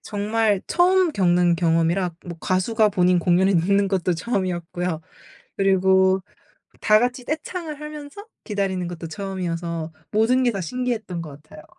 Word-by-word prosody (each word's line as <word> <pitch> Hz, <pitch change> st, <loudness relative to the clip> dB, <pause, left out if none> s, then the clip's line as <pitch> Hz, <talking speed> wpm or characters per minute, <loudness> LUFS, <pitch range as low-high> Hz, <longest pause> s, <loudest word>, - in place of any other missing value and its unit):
정말 210 Hz, -1 st, 0 dB
처음 360 Hz, -1 st, +3 dB
겪는 175 Hz, -3 st, +3 dB
경험이라. 170 Hz, +2 st, +1 dB
뭐 170 Hz, -2 st, -8 dB
가수가 210 Hz, +4 st, +2 dB
본인 180 Hz, -2 st, +2 dB
공연을 180 Hz, +2 st, +3 dB
늦는 200 Hz, +4 st, +2 dB
것도 185 Hz, -2 st, 0 dB
처음이었고요. 175 Hz, -3 st, -3 dB, 0.5 s
그리고 190 Hz, -1 st, +3 dB, 0.6 s
다 215 Hz, 0 st, +5 dB
같이 245 Hz, +1 st, -1 dB
떼창을 310 Hz, 0 st, -5 dB
하면서 300 Hz, +6 st, -8 dB, 0.2 s
기다리는 195 Hz, -4 st, -2 dB
것도 170 Hz, -1 st, -7 dB
처음이어서 170 Hz, -3 st, -4 dB, 0.2 s
모든 240 Hz, +5 st, +3 dB
게 240 Hz, -, +2 dB
다 195 Hz, -, -4 dB
신기했던 220 Hz, -3 st, -3 dB
것 150 Hz, -2 st, -11 dB
같아요. 155 Hz, -1 st, -14 dB
190 Hz, 325 characters per minute, -23 LUFS, 175-225 Hz, 0.6 s, 다